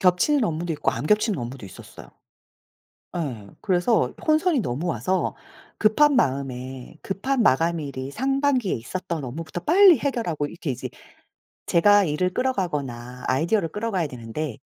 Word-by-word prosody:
겹치는 200 +10 +3
업무도 170 -2 -2
있고 - - 0
안 150 - -4
겹치는 210 -2 +2
업무도 120 -2 -6
있었어요. 95 - -13 1.1
예. 125 -11 -4
그래서 190 +4 +2
혼선이 310 -1 +3
너무 150 - -2
와서 175 +6 -1 0.4
급한 280 +7 +4
마음에 130 - -2
급한 240 +7 -1
마감일이 140 -2 0
상반기에 270 - +1
있었던 170 +6 -5
업무부터 160 +7 -6
빨리 355 - +6
해결하고 225 - -1
이렇게 170 0 -6
이제 130 +1 -5 0.8
제가 205 +3 +5
일을 180 +4 0
끌어가거나 140 - -2
아이디어를 165 +7 +1
끌어가야 200 -3 -2
되는데 125 +1 -5
170 Hz, 345 characters per minute, -24 LUFS, 135-220 Hz, 1.1 s, 빨리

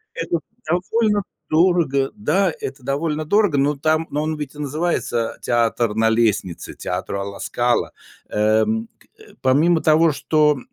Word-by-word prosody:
Это 165 0 -1 0.3
довольно 205 +4 +1 0.3
дорого, 155 -5 +2
да, 195 -2 +1
это 135 0 -6
довольно 150 +3 -2
дорого, 205 -2 +2
но 140 +2 +2
там 155 +3 0
но 150 - -1
он 155 0 -2
ведь 150 -1 -6
и - - -11
называется 145 -5 -1
театр 115 -2 +1
на 110 0 +3
лестнице, 110 -6 0
театр - - -4
"Ла 100 0 -5
Скала", 120 0 0 0.4
эм, 110 - +1 0.3
э. 435 - -17
Помимо 155 +6 +3
того, 160 +1 +4
что, 150 0 +2
150 Hz, 140 wpm, -21 LUFS, 120-170 Hz, 0.4 s, того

